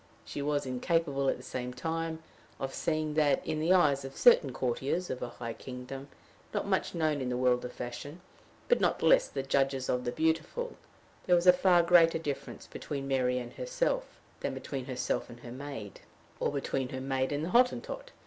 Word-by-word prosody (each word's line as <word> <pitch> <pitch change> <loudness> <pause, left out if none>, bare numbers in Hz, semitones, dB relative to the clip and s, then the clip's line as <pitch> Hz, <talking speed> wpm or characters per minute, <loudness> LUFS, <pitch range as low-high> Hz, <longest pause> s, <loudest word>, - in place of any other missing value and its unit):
She 145 - -5
was 145 0 0
incapable, 140 +1 0
at - - 0
the 125 - -12
same 125 -1 -5
time, 160 +3 -3 0.4
of 135 0 -3
seeing 155 -2 -1
that, 150 -3 +2
in 155 - -1
the 160 +3 +1
eyes 150 -7 +4
of 135 0 -8
certain 170 - +6
courtiers 135 +8 -1
of 130 - -4
a 120 - -3
high 115 -1 -6
kingdom, 130 +2 -8 0.5
not - - 0
much - - 0
known 155 -3 +1
to 130 - -2
the 125 0 -1
world 125 -1 +2
of 125 - -5
fashion, 125 +7 -7 0.5
but 485 - +3
not - - +2
the - - -2
less - - +5 0.2
judges 135 -1 +1
of 125 0 +1
the 120 - -1
beautiful, 160 - -1 0.5
there 180 - +6
was 175 0 +2
a 180 - +9
far 180 -1 +4
greater 170 -1 +6
difference 145 -4 -5
between 140 -2 -5
Mary 125 -2 +1
and 120 -1 -5
herself - - -2 0.2
than - - -3
between 135 -3 -5
herself 130 -1 -2
and 120 0 -12
her 120 - -9
maid, 130 -6 -7 0.4
or - - 0
between 135 -2 -2
her 130 - -4
maid 130 0 -1
and 145 +2 -1
the - - -3
Hottentot. 255 - +1
140 Hz, 195 wpm, -31 LUFS, 130-165 Hz, 0.5 s, a